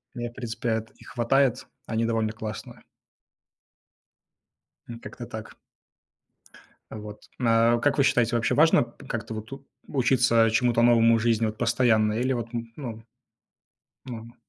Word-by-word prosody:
У - - -6
меня, 120 0 -4
в - - -23
принципе, 115 -2 -3
их - - -15
хватает. 130 +1 +1 0.2
Они 115 0 -1
довольно 115 -1 0
классные. 110 -1 -8 2.1
М, 115 - -7
как-то - - -9
так. - - -8 1.3
Э, - - -7
вот. 105 0 -9 0.2
А 115 0 +3
как 145 +4 +1
вы 140 - +4
считаете, 120 -3 +2
вообще 115 - 0
важно 160 +2 +5
п 120 -1 -11
как-то 115 -1 -5
вот 110 0 -6
тут 135 +2 -11 0.2
учиться 125 -4 +3
чему-то 120 0 +2
новому 115 -1 +5
в - - -3
жизни 115 -1 +1
вот 110 0 -4
постоянно 115 -3 +2
или 125 +4 0
вот, 120 -1 -4
м, 115 -1 -5
ну 115 -6 -7 1.0
Норма. 115 -2 -9
115 Hz, 150 wpm, -26 LUFS, 115-125 Hz, 2.1 s, важно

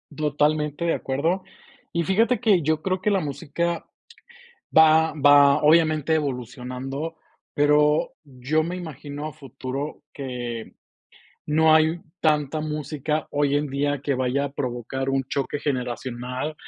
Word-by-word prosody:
Totalmente 150 +1 0
de 170 - +2
acuerdo. 160 +8 -1 0.5
Y 170 0 0
fíjate 225 +8 +2
que 210 -7 +3
yo 155 +1 0
creo 185 -1 -1
que 210 - +1
la 195 - +3
música 170 +3 -3 0.9
va 160 0 +6
va, 145 -1 +6
obviamente, 155 0 +4
evolucionando, 135 +2 -4 0.4
pero 150 +1 +3
yo 140 +3 -1
me 175 +3 -4
imagino 150 -4 -6
a 155 - -8
futuro 135 0 -6
que 120 -4 -6 0.7
no 155 +1 +4
hay 160 +2 +3 0.2
tanta 150 -1 +1
música 150 0 -3
hoy 145 -1 +1
en 145 0 -1
día 140 +1 -1
que 140 -1 0
vaya 130 +2 0
a 140 - -5
provocar 130 -1 -3
un 135 0 0
choque 140 +2 -2
generacional, 125 +1 -3
150 Hz, 130 wpm, -24 LUFS, 135-155 Hz, 0.9 s, va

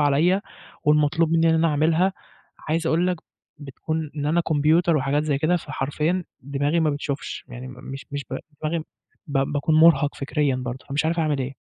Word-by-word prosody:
عليّا 160 +7 +3 0.4
والمطلوب 150 +2 +3
منّي 165 0 +4
إن - - +3
أنا 165 +1 +3
أعملها. 160 +5 +2 0.6
عايز 165 +1 0
أقول 170 +3 +2
لك 180 - 0 0.4
بتكون 155 +2 -4
إن 145 -1 -2
أنا 165 +3 +3
كمبيوتر 160 +1 +3
وحاجات 140 +2 +1
زي 145 -3 0
كده، 165 +4 +2
فحرفيًا 155 +4 -2 0.2
دماغي 145 +4 0
ما 155 -2 +2
بتشوفش، 145 0 -4
يعني 125 +1 -8
م - - -8
مش 135 +1 -8
مش 145 -1 -4 0.4
دماغي 160 +2 0 0.5
ب 140 -2 -1
باكون 150 +2 +1
مُرهق 155 -2 +5
فكريًا 140 -1 0
برضه، 125 0 -5
فمش 145 +3 0
عارف 165 +2 0
أعمل 155 -3 +1
إيه. 130 +1 -3
150 Hz, 175 wpm, -24 LUFS, 140-165 Hz, 0.6 s, مُرهق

